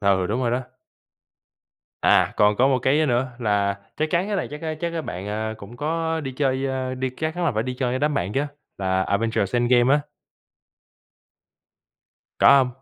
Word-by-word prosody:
Ừ, 95 -2 +2
đúng 115 +6 -1
rồi 120 - +1
đó. 125 +2 0 1.4
À, - - +4
còn 105 0 +4
có 130 +4 +4
một 130 -2 +2
cái, 130 +5 +2
ơ, 155 - +2
nữa 125 0 +1
là, 100 -4 0 0.2
chắc 155 +1 -1
chắn 180 +3 +1
cái 210 - -1
này 185 - -2
chắc, 150 +2 -8
a, 160 -1 -2
chắc, 170 -1 -2
a, 165 - -2
bạn, 95 -7 -6
à, 110 +1 -3
cũng 110 +3 -11
có 160 +3 -1
đi 135 -3 -5
chơi, 130 0 0
ơ, 130 -1 -2
đi 130 0 -2
các 155 +5 -3
chắn 175 -1 -2
là 160 - +2
phải 110 0 0
đi 125 0 -4
chơi 125 -1 -1
với 130 - 0
đám 150 +2 +1
bạn 95 -4 -1
chứ, 140 +4 +1 0.3
là 95 -1 +1
Avengers: 100 +1 0
EndGame 120 +2 +4
á? 150 - +2 2.4
Có - - +4
hông? 130 -2 +4
130 Hz, 205 wpm, -23 LUFS, 110-150 Hz, 2.4 s, À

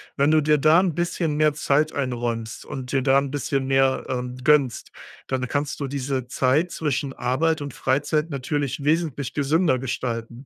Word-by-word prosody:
Wenn 140 +2 +3
du 155 - +5
dir 150 0 +3
da 155 +4 +5
'n 180 -4 0
bisschen 170 -2 -1
mehr 150 0 +3
Zeit 150 +1 +1
einräumst 120 -4 -3
und 130 -2 -7
dir 135 - +2
da 135 +1 +4
'n 140 0 0
bisschen 135 -1 -2
mehr, 135 0 +2
ähm, 125 0 -4
gönnst, 140 -3 +2 0.4
dann 130 -1 -1
kannst 145 +1 -2
du 140 - -1
diese 135 -2 -3
Zeit 140 +7 +1
zwischen 140 -4 -2
Arbeit 150 +7 0
und 140 -3 -6
Freizeit 145 +4 0
natürlich 140 0 -3
wesentlich 150 -4 0
gesünder 145 -1 +2
gestalten. 120 -1 -4
140 Hz, 170 wpm, -23 LUFS, 130-150 Hz, 0.4 s, du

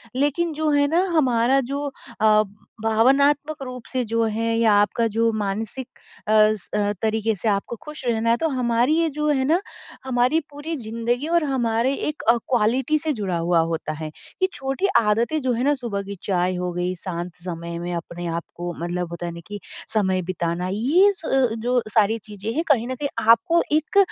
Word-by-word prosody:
लेकिन 290 +5 +1
जो 310 +1 0
है 285 0 +4
ना 335 +4 +2
हमारा 255 -1 +3
जो 285 +1 -2 0.4
अ, 215 -1 +5 0.4
भावनात्मक 275 +7 +3
रूप 250 -2 -8
से 255 -1 0
जो 230 +1 0
है 225 +1 0
या 225 -2 +4
आपका 230 +2 +1
जो 230 0 +3
मानसिक 215 +4 -3 0.4
अस 215 -1 +3
अ, 205 -1 +1
तरीक़े 220 0 +1
से 220 - -4
आपको 200 +4 -1
खुश 300 -3 -8
रहना 230 -1 +1
है 235 - +4
तो 325 - 0
हमारी 245 +1 +1
ये 330 -1 +2
जो 300 0 0
है 265 -3 +2
ना 335 +6 +2 0.4
हमारी 255 +4 +2
पूरी 290 +3 -5
ज़िंदगी 235 +3 -2
और 340 0 +2
हमारे 245 -2 +1
एक 300 0 -3
अ, 235 - +6
क्वालिटी 250 +6 +1
से 315 -1 -1
जुड़ा 195 -7 -2
हुआ 170 0 +2
होता 155 -1 -3
है। 155 0 -5 0.3
ये 375 - +4
छोटी 270 +9 -1
आदतें 230 +8 +1
जो 260 -1 0
हैं 235 +2 -1
ना 290 +2 +3
सुबह 235 -7 -3
की 200 +1 -7
चाय 185 -1 0
हो 180 0 -2
गई, 180 +1 -1
शांत 175 -1 -5
समय 170 -1 -5
में 175 +1 -4
अपने 170 +1 -6
आप 170 0 -2
को 175 0 -4
मतलब 175 0 -3
होता 170 0 -5
है 170 - -3
ना 170 - -8
कि 205 0 -6 0.3
समय 190 -4 +1
बिताना 170 0 -2
ये 310 - +4
स 330 - -11
अ - - -3 0.2
अ, - - -2
जो 245 +2 +1
सारी 220 +1 +3
चीज़ें 210 0 -6
हैं 320 - 0
कहीं 245 -5 +3
न 260 - -3
कहीं 285 +2 -3 0.2
आपको 330 +10 +4
एक 310 +6 +1
230 Hz, 200 wpm, -23 LUFS, 200-275 Hz, 0.4 s, अ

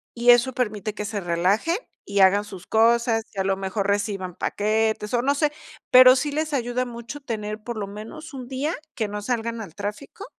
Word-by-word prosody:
Y 240 +1 +2
eso 245 +2 +4
permite 215 -4 -2
que 210 - -4
se 205 0 -3
relajen 190 - +1 0.3
y 200 -1 +1
hagan 200 +2 +5
sus 190 -3 -10
cosas, 230 0 +3
y 195 - -4
a - - +2
lo 195 0 0
mejor 195 +1 -2
reciban 200 -3 -1
paquetes, 215 +1 0
o 240 - +3
no 280 +2 +1
sé, 295 0 +1 0.4
pero 255 0 +9
sí 290 +2 -1
les 310 0 -2
ayuda 250 -1 0
mucho 235 +3 -8
tener, 215 -4 -4
por 240 +1 -5
lo 205 - -2
menos, 225 +10 -9
un 255 -2 -7
día 275 +6 -2 0.2
que 215 -3 -2
no 210 0 -4
salgan 230 0 -2
al 175 -7 -10
tráfico 210 - -6
225 Hz, 200 wpm, -24 LUFS, 205-255 Hz, 0.4 s, pero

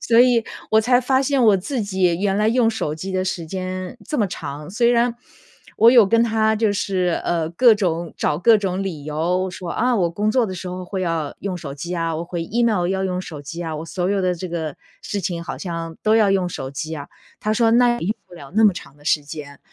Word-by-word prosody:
所 230 0 +3
以 245 -2 +4 0.3
我 220 - +6
才 245 +3 +3
发 260 +1 +2
现 275 0 +1
我 210 -3 +6
自 240 +7 -3
己 185 -3 +1
原 195 -1 +1
来 210 +1 +2
用 235 0 +3
手 185 -9 -2
机 185 +5 -6
的 185 0 0
时 180 -2 -3
间 185 +4 -5
这 300 - -3
么 210 - +3
长。 150 -4 -7
虽 235 +3 +2
然 240 0 +2 0.6
我 230 +2 +7
有 235 -5 +7
跟 230 +3 +3
他 220 -1 +2
就 215 -1 +1
是， 185 -3 0
呃， 165 -2 0
各 225 +6 +5
种 170 -5 -2
找 150 - 0
各 225 +4 +6
种 195 -2 -2
理 170 -7 -5
由 175 +5 -1
说： 180 -1 -7
“啊， 250 +2 +1
我 180 -5 +2
工 205 +6 -1
作 245 0 +2
的 190 - -5
时 180 0 -6
候 180 0 -5
会 185 +1 -4
要 165 -4 -2
用 190 -2 -3
手 140 -4 -7
机 170 +5 -6
啊， 165 -1 -1
我 165 - -4
回 170 -1 -4
email 220 -3 +1
要 190 +1 -1
用 185 -1 -1
手 150 -5 -8
机 170 +4 -7
啊， 160 -2 -4
我 155 - -5
所 180 +2 -2
有 200 -1 +1
的 180 -1 +2
这 175 +2 -6
个 160 -4 -4 0.3
事 205 - -3
情 170 -2 -3
好 - - -6
像 165 -2 -5
都 215 0 +3
要 215 -3 +4
用 190 -2 +1
手 135 -6 -6
机 155 +3 -5
啊”。 140 -1 -8 0.3
他 215 - 0
说： 225 0 +3
“那 240 0 +4
也 170 - -4
用 215 - 0
不 - - -14
了 145 -3 -12
那 220 +1 +5
么 205 - +6
长 160 - -10
的 145 - -20
时 150 -1 +1
间。” 145 -1 -9
185 Hz, 275 characters per minute, -21 LUFS, 165-220 Hz, 0.6 s, 我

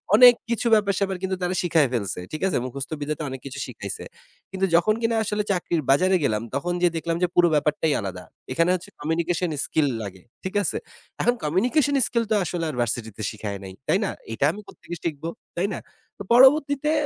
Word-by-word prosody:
অনেক 245 +2 +10 0.2
কিছু 235 0 0
ব্যাপার-স্যাপার 200 -2 +1
কিন্তু 190 0 0
তারা 180 +1 0
শিখায় 160 -6 +3
ফেলছে, 100 -6 -2
ঠিক 155 - -5
আছে? 185 - 0
মুখস্থ 135 +3 -5
বিদ্যাতে 150 +2 -3
অনেক 130 0 -6
কিছু 135 - -6
শিখাইছে। - - -6 0.5
কিন্তু 190 0 0
যখন 175 +5 +4
কিনা 230 0 +1
আসলে 210 0 -1
চাকরির 175 -3 0
বাজারে 185 +6 +4
গেলাম 110 -5 +1
তখন 175 +5 -1
যেয়ে 175 -2 +2
দেখলাম 165 +1 -1
যে 180 - +4
পুরো 175 0 +6
ব্যাপারটাই 150 +1 +1
আলাদা। 95 -2 -6 0.3
এখানে 165 +1 +2
হচ্ছে 185 - -7
কমিউনিকেশন 170 +3 0 0.2
স্কিল 155 -2 +1 0.2
লাগে, 95 -2 -9 0.2
ঠিক 190 - -5
আছে? - - 0 0.5
এখন 245 +1 +3
কমিউনিকেশন 240 - +2 0.3
স্কিল 235 -2 0
তো - - +4
আসলে 170 0 -2
আর 150 - -5
ভার্সিটিতে 110 -2 -3
শিখায় 105 -2 -5
নাই, 95 - -8
তাই 190 - +3
না? - - -1 0.2
এটা 140 +5 +1
আমি 210 - -9
কোত্থেকে 175 - -9
শিখবো, 160 0 -3 0.3
তাই 185 +3 +1
না? - - -5 0.4
তো - - -5
পরবর্তীতে 280 +3 +5
170 Hz, 190 wpm, -24 LUFS, 140-195 Hz, 0.5 s, অনেক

